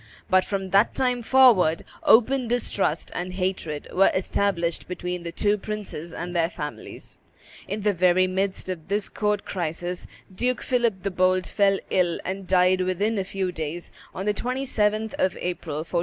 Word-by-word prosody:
But 185 0 +5
from 195 -2 -3
that 200 +3 +4
time 250 -2 +1
forward 225 -10 +5 0.2
open 250 +2 +4
distrust 210 -8 -1
and 180 +1 -4
hatred 185 -5 -3
were 195 +1 +5
established 185 -2 0
between 180 -1 -4
the 170 0 -5
two 205 +4 +1
princes 200 -6 -6
and 175 +2 -6
their 165 -1 +2
families. 150 -4 -8 0.5
In 210 +2 -3
the 205 0 +2
very 180 +1 +4
midst 190 +1 -2
of 180 -4 -5
this 205 +1 0
court 210 -1 -1
crisis 175 0 -4 0.3
Duke 250 +6 -1
Philip 235 -7 +1
the 195 0 -2
Bold 185 0 +2
fell 200 -1 +2
ill 175 -2 +2
and 190 +1 -4
died 185 0 +4
within 200 +4 0
a - - 0
few 190 -1 -3
days, 160 0 -5 0.2
on 190 - -5
the 210 - +2
27th 220 -3 0
of 185 - +1
April, 175 -4 -4
1404. 170 - -1
185 Hz, 165 wpm, -25 LUFS, 180-210 Hz, 0.5 s, But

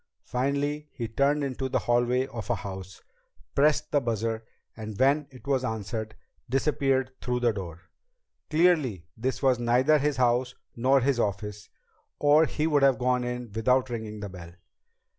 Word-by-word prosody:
Finally 140 +4 -1
he 120 -4 -4
turned 140 +6 +1
into 130 -1 -3
the - - +1
hallway 120 +2 +1
of 115 -5 -7
a 120 - +2
house, 95 -1 -8 0.5
pressed 150 +1 +2
the 145 - +3
buzzer, 115 -1 -2 0.3
and 110 -2 -7
when 140 +2 +3
it 130 0 -15
was 135 -2 +1
answered, 110 -1 -4 0.3
disappeared 135 -1 +1
through 125 0 -1
the 120 -2 +2
door. 90 -4 -7 0.7
Clearly 155 - +2
this 130 +5 -3
was 130 -2 +3
neither 125 +6 +3
his 145 0 0
house 125 0 +2 0.2
nor 130 +3 +3
his 130 -1 +1
office 105 -1 -3 0.5
or 150 +2 +5
he 155 - -1
would 150 -3 +3
have 135 -3 +5
gone 125 +1 +1
in 125 -2 -4
without 125 +4 +1
ringing 110 -2 -5
the 100 - -5
bell. 85 -2 -10
125 Hz, 160 wpm, -27 LUFS, 110-140 Hz, 0.7 s, or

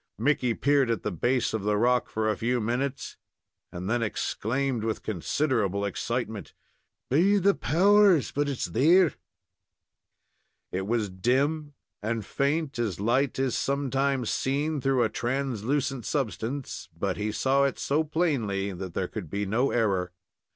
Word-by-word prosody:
Mickey 125 -5 +1
peered 140 -3 +2
at 115 -4 -1
the 105 - -1
base 120 +9 0
of 110 - -1
the 105 +1 +1
rock 125 +3 +2
for 110 0 -1
a 110 - +1
few 120 +5 0
minutes, 125 +4 -2 0.5
and 90 +1 -6
then 120 +3 +1
exclaimed, 120 +3 -1
with 110 -1 -2
considerable 100 - 0
excitement: 110 0 -3 0.6
"Be 185 +9 +4
the 200 +1 +4
powers! 195 -1 +4
but 145 0 0
it's 135 - -2
there!" 165 +8 +4 1.6
It 95 +1 -3
was 110 -3 0
dim 140 +9 0 0.3
and 110 0 -2
faint, 145 +1 -1
as 105 -7 -1
light 120 +6 +1
is 130 -2 0
sometimes 135 -2 0
seen 145 +2 -1
through 135 -2 +2
a 110 - +1
translucent 130 +1 -2
substance, 135 0 -3
but - - -1
he 105 +1 -2
saw 135 +5 +2
it 140 - -1
so 150 +3 +1
plainly 130 - -1
that 90 -1 -7
there 95 - -1
could 95 -6 -7
be 100 +4 -2
no 115 +7 +1
error. 95 -6 0
125 Hz, 145 wpm, -27 LUFS, 110-140 Hz, 1.6 s, Be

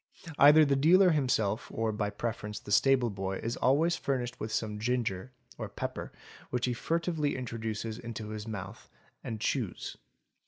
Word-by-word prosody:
Either 150 +2 +8
the 140 -1 +2
dealer 175 +7 +6
himself 120 -8 +1
or 115 0 -1
by 105 -1 -1
preference 105 -1 -4
the 105 - -10
stable 125 +2 +4
boy 95 -1 -3
is 115 +1 -3
always 155 +7 +3
furnished 125 -3 -2
with 110 - -4
some 105 -1 -2
ginger 120 -2 -1 0.3
(or 110 -3 -4
pepper) 100 - -5 0.4
which 125 -1 0
he 125 - 0
furtively 160 +2 -1
introduces 115 -2 -4
into 115 -2 -6
his 110 0 -6
mouth 105 -4 -7 0.3
and 110 -2 -4
chews. 110 -3 -2
115 Hz, 155 wpm, -30 LUFS, 105-135 Hz, 0.4 s, Either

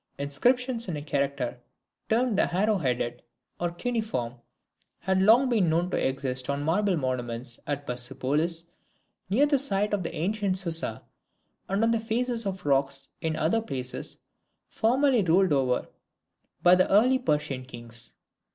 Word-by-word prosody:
Inscriptions 240 - 0
in 170 -4 -3
a - - -5
character 140 -4 -2 0.5
termed 235 0 +2
the 195 - +2
Arrow 205 +3 +2
headed, 125 -4 -1 0.4
or 175 - 0
Cuneiform, 215 - -2 0.6
had 190 0 0
long 230 +7 +6
been 215 -9 +2
known 170 +3 +1
to - - 0
exist 130 -1 -2
on 140 0 -1
the - - -4
marble 185 +3 +2
monuments 120 -3 -3
at 145 -1 -3
Persepolis, 135 +7 -1 0.7
near 245 +9 +4
the 290 -2 +2
site 210 -5 0
of 205 - +1
the 165 - -4
ancient 195 +3 0
Susa, 165 - -1 0.7
and 195 +3 +1
on 230 - +3
the 230 - +2
faces 230 0 -1
of 190 -3 -5
rocks 135 -1 0
in 160 -1 -1
other 160 +9 +1
places 130 - -5 0.5
formerly 255 +1 +2
ruled 180 -1 +3
over 130 -3 +1 0.8
by 175 - +7
the 185 0 +4
early 250 +6 +5
Persian 150 - -1
kings. 120 -3 -8
170 Hz, 150 wpm, -27 LUFS, 135-220 Hz, 0.8 s, by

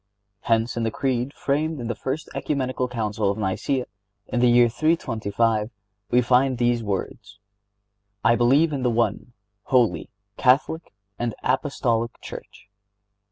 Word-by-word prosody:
Hence 115 +2 +1
in 120 - -2
the 115 - +1
Creed 130 +2 -1
framed 150 +2 -1
in 120 - -5
the 115 - -1
first 135 +7 -4
Ecumenical 130 -3 -1
Council 110 -4 -1
of 100 - -1
Nicæa, 110 +6 -1 0.4
in 125 - -2
the 125 0 +5
year 120 0 +6
325, 115 -6 0 0.4
we 125 +1 +3
find 130 +2 +3
these 120 0 +1
words: 100 0 -4 0.9
"I 120 - +6
believe 140 +7 +3
in 135 - -2
the 125 - +2
One, 120 +1 -1 0.3
Holy, 125 -4 +2 0.3
Catholic 140 +5 +2 0.3
and 120 -2 -2
Apostolic 125 -4 0
Church." - - -10
120 Hz, 135 wpm, -24 LUFS, 115-130 Hz, 0.9 s, year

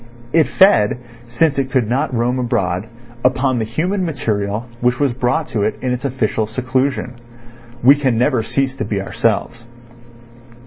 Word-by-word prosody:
It 160 -1 +4
fed, 125 - +4 0.3
since 140 +4 +1
it 135 -1 -1
could 125 -4 +1
not 125 +4 0
roam 125 +1 0
abroad, 95 -5 -1 0.4
upon 130 0 +2
the 110 - -1
human 180 - -1
material 110 - -2
which 125 +1 +1
was 140 -4 +1
brought 125 +5 -1
to 110 - -2
it 105 +2 0
in 130 - -2
its 125 +2 -3
official 115 -4 -1
seclusion. 130 +2 -1 0.7
We 135 +3 +8
can 135 -5 0
never 125 0 +2
cease 135 +3 -1
to - - -2
be 105 -2 -2
ourselves. 115 +4 -1
125 Hz, 160 wpm, -18 LUFS, 115-135 Hz, 0.7 s, We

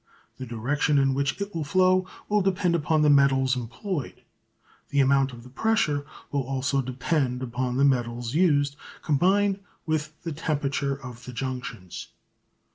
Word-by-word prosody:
The 130 - -6
direction 140 +6 0
in 135 -1 +3
which 140 +5 -1
it 200 +1 -4
will 165 - -2
flow 185 +3 +3 0.2
will 210 0 +2
depend 185 -2 +1
upon 155 -1 +2
the 150 - +5
metals 135 -2 +4
employed. 140 - -5 0.7
The 140 - +1
amount 135 0 +4
of 120 -1 -11
the 125 - -13
pressure 145 - +1 0.2
will 140 - +1
also 135 +1 0
depend 130 0 -1
upon 125 0 -2
the 140 - +4
metals 120 -2 0
used, 145 -4 +3 0.3
combined 195 +6 +2 0.3
with 155 -1 -2
the 165 - -3
temperature 145 -2 -1
of 125 -3 -10
the 125 - -8
junctions. 125 -8 -5
140 Hz, 150 wpm, -26 LUFS, 130-160 Hz, 0.7 s, the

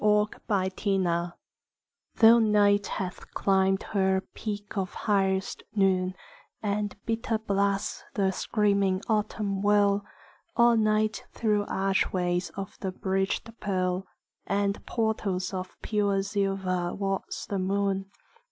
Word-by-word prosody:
XVI 210 -2 +1
=Sonnet= 175 -4 0 0.8
Though 230 +1 +7
Night 205 -2 +4
hath 185 -2 -5
climbed 190 0 +2
her 190 -1 +2
peak 205 -1 -5
of 190 -2 -2
highest 195 -2 0
noon, 185 -2 +2 0.5
And 205 0 -1
bitter 225 0 0
blasts 200 -1 -1
the 195 -2 +2
screaming 200 -1 +1
autumn 210 -2 0
whirl, 205 0 +3 0.5
All 235 0 +5
night 215 0 +1
through 210 -2 +1
archways 185 -2 0
of 195 -1 -6
the 190 - -3
bridgèd 195 +4 -2
pearl 185 -2 -1 0.4
And 200 0 0
portals 210 -5 -1
of 185 0 -6
pure 200 -2 +1
silver 195 -3 -1
walks 195 -1 -3
the 200 - -2
moon. 195 0 0
200 Hz, 110 wpm, -28 LUFS, 190-210 Hz, 0.8 s, Though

